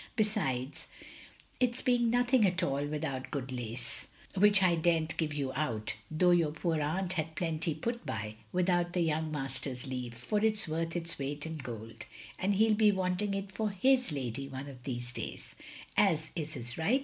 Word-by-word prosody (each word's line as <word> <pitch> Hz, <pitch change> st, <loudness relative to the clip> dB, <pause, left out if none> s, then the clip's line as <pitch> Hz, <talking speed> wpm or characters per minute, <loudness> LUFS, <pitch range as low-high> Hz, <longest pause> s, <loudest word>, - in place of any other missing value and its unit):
Besides 195 Hz, -, 0 dB, 0.7 s
it's 250 Hz, -1 st, +1 dB
being 245 Hz, -2 st, +3 dB
nothing 245 Hz, 0 st, +4 dB
at 180 Hz, 0 st, 0 dB
all 140 Hz, -2 st, +1 dB
without 145 Hz, -3 st, -3 dB
good 135 Hz, -2 st, -3 dB
lace 120 Hz, 0 st, -4 dB
— -, -, -24 dB
^which 205 Hz, 0 st, +6 dB
I 180 Hz, -2 st, +5 dB
dare 170 Hz, +1 st, +3 dB
n*t 160 Hz, 0 st, -2 dB
give 160 Hz, -2 st, 0 dB
you 135 Hz, -3 st, -1 dB
out 115 Hz, -8 st, -1 dB
— -, -, -27 dB
^though 180 Hz, +1 st, +6 dB
your 165 Hz, -3 st, +3 dB
poor 160 Hz, +1 st, 0 dB
atmt 170 Hz, +5 st, 0 dB
had 160 Hz, -2 st, -2 dB
plenty 165 Hz, -2 st, -1 dB
put 235 Hz, +9 st, -3 dB
by 105 Hz, 0 st, -3 dB
— 110 Hz, -, -30 dB
^without 175 Hz, -1 st, +2 dB
the 180 Hz, -, +2 dB
young 160 Hz, -1 st, +1 dB
master's 135 Hz, -3 st, -4 dB
leave, 125 Hz, -3 st, -4 dB
for 205 Hz, -, -1 dB
it 220 Hz, -1 st, +5 dB
*s 210 Hz, -, 0 dB
worth 165 Hz, +1 st, -2 dB
its 165 Hz, -2 st, -3 dB
weight 145 Hz, +2 st, -3 dB
in 160 Hz, 0 st, -4 dB
gold; 115 Hz, -4 st, -7 dB, 0.3 s
and 195 Hz, +2 st, +2 dB
he 220 Hz, +3 st, +5 dB
'U -, -, +5 dB
be 210 Hz, 0 st, +5 dB
wanting 190 Hz, +1 st, 0 dB
it 195 Hz, 0 st, -4 dB
for 215 Hz, +2 st, -1 dB
his 250 Hz, +3 st, +3 dB
lady 135 Hz, -1 st, -3 dB
one 135 Hz, +1 st, -6 dB
of 130 Hz, -3 st, -11 dB
these 120 Hz, -2 st, -4 dB
days; -, -, -6 dB, 0.4 s
as 160 Hz, -6 st, +3 dB
is 155 Hz, -3 st, -3 dB
his 120 Hz, +1 st, -6 dB
right. 220 Hz, +12 st, +3 dB
160 Hz, 200 wpm, -32 LUFS, 135-195 Hz, 0.7 s, ^which